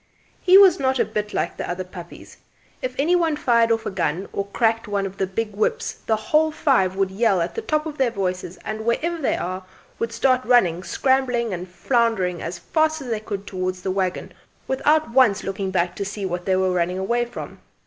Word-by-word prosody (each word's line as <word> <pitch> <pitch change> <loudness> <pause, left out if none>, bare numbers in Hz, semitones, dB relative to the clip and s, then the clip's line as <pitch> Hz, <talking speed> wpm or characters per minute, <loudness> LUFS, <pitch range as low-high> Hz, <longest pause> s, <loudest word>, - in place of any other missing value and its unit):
He 370 +1 +7
was 390 -4 +7
not 265 -1 +1
a - - +2
bit 210 0 -3
like - - -2
the - - -4
other 180 +1 -3
puppies; 180 -1 -11 0.4
if 255 -1 -3
any 320 +6 +3
one 330 -3 +2
fired 235 -5 +3
off 225 -1 0
a - - -2
gun 180 0 -1
or 200 0 -2
cracked 225 +2 0
one 200 -1 -1
of 195 0 -7
the 190 - 0
big 210 +2 -3
whips 455 - 0 0.2
the 220 - +3
whole 305 +9 +2
five 250 - +2
would 195 -1 0
yell 200 -1 +2
at 170 - -2
the 455 - -3
top 310 -8 -1
of 305 -2 -6
their 260 -2 +3
voices 185 -4 -3
and, 215 0 -4
wherever 320 +9 0
they 270 - +1
were, 185 +1 -4 0.4
would 230 0 -2
start 255 +1 +2
running, 180 -10 +3
scrambling 250 +1 +1
and 180 +1 -5
floundering 190 -2 0
as 170 +2 -5
fast 315 - 0
as 265 -4 -7
they 225 -2 -1
could 205 -2 -6
towards 185 -1 -4
the 190 - -1
waggon 185 -1 -2 0.3
without 295 +1 +2
once 230 -6 +4
looking 195 0 -3
back 180 -1 0
to 200 - -2
see 200 0 -4
what 180 -1 -3
they 190 - +2
were 185 0 +2
running 180 0 0
away 235 +6 0
from. 240 - -8
215 Hz, 215 wpm, -22 LUFS, 185-260 Hz, 0.4 s, He